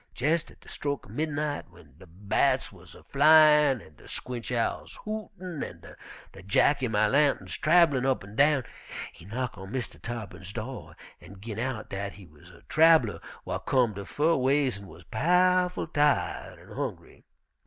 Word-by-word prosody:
Jes' 155 +5 +1
at - - -18
de - - -20
stroke 145 -1 -4
er - - -14
midnight, 150 +1 -2
w'en 70 -5 -19
de 95 - -14
bats 95 +5 0
wuz - - -15
a - - -15
flyin' 150 -3 +5
an' 75 - -17
de - - -16
squinch 125 -1 -5
owls 115 -2 -2
hootin' 195 -6 -5
an' - - -9 0.5
de 95 - -12
jacky 130 +8 +2
my 110 -1 +2
lanturns 140 +4 +1
trabellin' 155 -5 +4
up 130 -4 +1
an' 100 +2 -12
down, 145 0 +4 0.5
he 85 - -15
knock 120 +3 -4
on 95 +1 -9
Mistah 130 -1 -5
Tarr'pin's 100 -5 -7
do' 125 +4 -7 0.3
an' 95 +2 -13
gin 110 +1 -6
out 120 -3 -4
dat 100 0 -4
he 100 - -13
wuz 85 +2 -18
a 85 - -18
trabeller 160 -8 +4 0.3
whar - - -3
comed 120 -6 +1
a 100 - -6
fur 160 - +2
ways 130 -4 +1
an' 100 - -12
wuz - - -13
pow'ful 180 +7 +2
tired 150 -2 0
an' - - -17
hongry. - - -6
130 Hz, 175 wpm, -28 LUFS, 105-150 Hz, 0.5 s, flyin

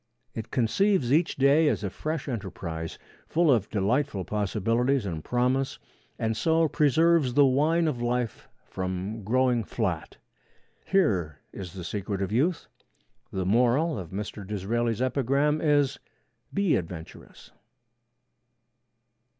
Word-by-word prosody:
It 110 - -6
conceives 135 - +2
each 165 +2 +2
day 140 +4 +4
as 145 - 0
a 100 - -2
fresh 155 +3 -4
enterprise, 90 -8 -5 0.3
full 165 -2 +3
of 110 -6 +2
delightful 105 0 0
possibilities 115 +5 0
and 80 -5 -4
promise, 125 +2 0 0.4
and 110 0 -1
so 160 +5 +2
preserves 155 -2 +3
the 145 -1 +6
wine 155 +5 +2
of 130 -6 -2
life 120 -1 -2 0.2
from 95 +3 -4
growing 125 +2 +2
flat. 95 -9 -3 0.7
Here 95 - +1 0.2
is 90 -4 -7
the 90 - -7
secret 100 +2 -3
of 95 - -3
youth. 150 +10 +1 0.6
The 95 -1 -2
moral 125 - +2
of 90 -4 -7
Mr. 105 +2 -5
Disraeli's 110 +4 -1
epigram 140 +4 +1
is, 145 -3 +2 0.5
'Be 200 -4 +2
adventurous.' 85 -2 -9
120 Hz, 120 wpm, -27 LUFS, 100-145 Hz, 0.7 s, the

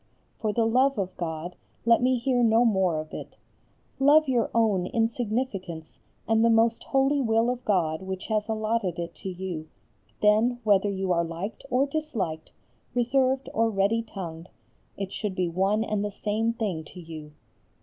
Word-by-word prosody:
For 215 -2 0
the 225 +1 +1
love 255 +3 +3
of 185 -2 -3
God 170 +1 -4 0.3
let 235 0 +5
me 255 0 +3
hear 245 0 +1
no 230 +1 +4
more 190 -7 +2
of 155 0 -8
it: - - -8 0.6
love 295 +3 +6
your 245 -3 +1
own 210 -6 +2
insignificance 220 -8 -2 0.3
and 225 0 +3
the 230 - +5
most 225 0 +3
holy 270 +1 +2
will 225 0 +2
of 250 0 -5
God 165 -6 +1
which 190 0 -5
has 215 0 -1
allotted 215 -4 -1
it 170 0 -4
to 190 - -6
you, 180 -4 -5 0.5
then 220 +4 +3
whether 205 -1 +3
you 190 -1 -2
are 170 -1 +2
liked 170 +6 -6
or 255 +2 +3
disliked, 240 - -3 0.4
reserved 260 +2 +2
or 225 0 +2
ready 205 +2 +1
tongued, 175 -6 -8 0.5
it 195 -1 -4
should 205 -4 -3
be 185 -1 0
one 195 +5 +1
and 210 -2 -1
the 210 - -1
same 215 +3 -1
thing 200 -9 -3
to 180 - -12
you. 155 -3 -9
215 Hz, 170 wpm, -26 LUFS, 185-235 Hz, 0.6 s, love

